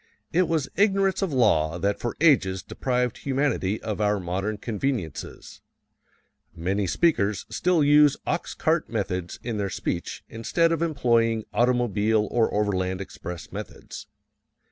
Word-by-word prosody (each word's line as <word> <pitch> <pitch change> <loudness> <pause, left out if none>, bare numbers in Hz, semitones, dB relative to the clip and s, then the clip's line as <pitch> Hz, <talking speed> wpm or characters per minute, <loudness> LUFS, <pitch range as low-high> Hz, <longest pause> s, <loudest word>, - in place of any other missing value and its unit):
It 180 +1 +3
was 160 -4 0
ignorance 195 -1 +2
of 195 -4 0
law 85 - +2
that 100 +3 -1
for 120 - -4
ages 95 - +3
deprived 125 -2 -1
humanity 130 -7 0
of 110 -1 -3
our 105 -1 +2
modern 95 +4 -2
conveniences. 110 - -4 0.9
Many 95 +4 -1
speakers 105 - +1
still 175 -4 +2
use 145 0 +5
ox - - -2
cart - - 0
methods 90 -1 -3
in 115 -3 -3
their 100 -1 -1
speech 85 -2 -4
instead 165 +9 +1
of 165 -1 0
employing 115 -8 +2
automobile 110 -3 +2
or 115 -2 +2
overland 95 -3 0
express 90 -3 -8
methods. - - -8
115 Hz, 130 wpm, -25 LUFS, 100-140 Hz, 0.9 s, use